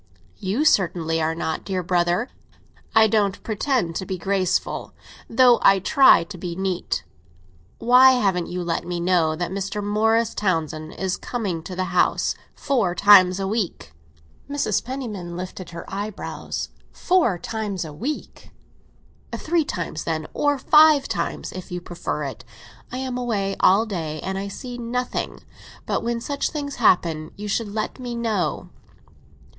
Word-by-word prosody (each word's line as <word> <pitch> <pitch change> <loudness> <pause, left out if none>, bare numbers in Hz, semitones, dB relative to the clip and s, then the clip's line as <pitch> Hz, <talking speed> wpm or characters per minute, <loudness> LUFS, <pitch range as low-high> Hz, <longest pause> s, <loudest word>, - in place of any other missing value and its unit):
"You 215 +11 -1
certainly 165 - +2
are 160 +1 0
not, 160 -1 -3
dear 185 -2 -2
brother." 175 +6 +1 0.7
"I 220 0 +7
don't 205 -2 +1
pretend 220 - -1
to 190 - -4
be 190 - -3
graceful, 185 0 -1 0.4
though 245 0 +5
I 195 - +6
try 265 - +6
to 180 +1 -10
be 175 -1 -5
neat. 190 -1 -2 0.7
Why 255 +2 +7
haven't 195 -8 +1
you 180 0 -4
let 170 -1 -2
me 175 0 -4
know 170 -3 +2
that 175 +2 -3
Mr. 195 +2 -3
Morris 225 +2 +2
Townsend 160 -5 -2
is 190 -1 -2
coming 200 -9 -3
to 180 +3 -8
the 185 - -1
house - - +2 0.2
four 235 -11 0
times 190 -1 +6
a 195 - -1
week?" 195 - -3 0.6
Mrs. 285 -8 0
Penniman 215 -10 -5
lifted 185 -1 -7
her 170 0 -8
eyebrows. 205 +1 -5 0.2
"Four 350 - +2
times 205 -2 -4
a 155 - -8
week?" 270 - -6 0.9
"Five 320 -2 0 1.4
times, - - -3
if 185 -1 -9
you 180 - -3
prefer 170 -3 -4
it. 135 -2 -6 0.5
I 250 - -4
am 255 -1 -3
away 205 -5 -1
all 200 +4 +5
day, 160 -7 -4
and 190 - -3
I 200 - -4
see 245 +4 -7
nothing. 245 +1 -3 0.4
But - - -1
when 235 0 -1
such 280 +4 -2
things 285 -2 -5
happen, 165 -8 +2
you 210 +1 -6
should 210 +1 -1
let 215 +4 -3
me 245 -2 -5
know." 230 -2 -2
195 Hz, 145 wpm, -23 LUFS, 175-235 Hz, 1.4 s, I